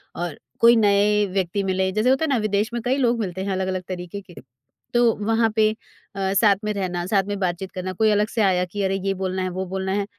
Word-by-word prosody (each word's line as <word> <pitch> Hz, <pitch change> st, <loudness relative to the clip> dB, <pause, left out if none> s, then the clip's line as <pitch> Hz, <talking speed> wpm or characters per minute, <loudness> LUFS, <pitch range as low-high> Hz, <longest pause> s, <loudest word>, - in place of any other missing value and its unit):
और 175 Hz, -3 st, -4 dB, 0.2 s
कोई 235 Hz, +1 st, +7 dB
नए 205 Hz, +1 st, +3 dB
व्यक्ति 195 Hz, +1 st, -1 dB
मिलें। 190 Hz, 0 st, 0 dB
जैसे 215 Hz, +4 st, +2 dB
होता 270 Hz, +4 st, +2 dB
है 315 Hz, -, -3 dB
ना 265 Hz, -, +2 dB
विदेश 205 Hz, +3 st, 0 dB
में 235 Hz, -, -2 dB
कई 260 Hz, +3 st, +1 dB
लोग 240 Hz, -3 st, +1 dB
मिलते 190 Hz, -2 st, -3 dB
हैं 200 Hz, -, -2 dB
अलग-अलग 185 Hz, -1 st, -2 dB
तरीके 180 Hz, +2 st, -6 dB
के, 180 Hz, -3 st, -17 dB, 0.6 s
तो 240 Hz, -1 st, +4 dB
वहाँ 225 Hz, +1 st, +2 dB
पे 215 Hz, -1 st, +4 dB, 0.4 s
अ, 195 Hz, 0 st, -1 dB
साथ 200 Hz, -1 st, +5 dB
में 210 Hz, 0 st, -1 dB
रहना, 180 Hz, -3 st, -3 dB
साथ 195 Hz, 0 st, +2 dB
में 205 Hz, -1 st, -3 dB
बात-चीत 185 Hz, +1 st, -2 dB
करना, 185 Hz, 0 st, -4 dB
कोई 220 Hz, +3 st, +2 dB
अलग 210 Hz, +1 st, +2 dB
से 225 Hz, -, -1 dB
आया 185 Hz, -2 st, +3 dB
कि, 200 Hz, +3 st, -5 dB
"अरे! 190 Hz, 0 st, 0 dB
ये 195 Hz, -, +1 dB
बोलना 190 Hz, 0 st, -3 dB
है, 185 Hz, -, -1 dB
वो 185 Hz, +1 st, -4 dB
बोलना 190 Hz, 0 st, -3 dB
है।" 200 Hz, 0 st, 0 dB
195 Hz, 240 wpm, -23 LUFS, 185-215 Hz, 0.6 s, कोई